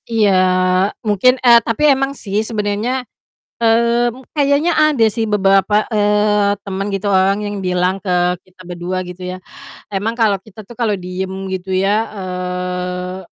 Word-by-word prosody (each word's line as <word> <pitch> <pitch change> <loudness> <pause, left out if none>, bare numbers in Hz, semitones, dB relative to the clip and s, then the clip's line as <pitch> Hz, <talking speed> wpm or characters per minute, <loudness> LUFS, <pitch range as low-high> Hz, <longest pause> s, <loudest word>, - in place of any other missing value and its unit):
Iya, 220 -3 +3 0.7
mungkin, 215 +5 +3
eee, 240 -2 +6
tapi 230 +4 -2
emang 270 +1 -1
sih 205 +1 -2
sebenernya, 220 +4 -2 0.6
mmm, 235 +2 +2
kayaknya 290 +3 +2
ada 305 -6 +3
sih 225 -2 -2
beberapa, 195 +1 +3
eee, 210 -1 +2
teman 195 +1 -3
gitu 195 +1 -3
orang 195 0 +3
yang 205 0 -4
bilang 180 +1 0
ke 190 - -4 0.3
kita 185 0 -26
berdua, 175 +1 -4
gitu 180 +1 -9
ya. 185 - -5 0.5
Emang 205 +3 -2
kalau 220 -4 +2
kita 215 +2 -14
tuh 225 +3 -14
kalau 230 -4 0
diem 190 +1 -5
gitu 190 0 -4
ya, 200 +4 +1
eee, 180 -1 -4
205 Hz, 145 wpm, -17 LUFS, 185-230 Hz, 0.7 s, eee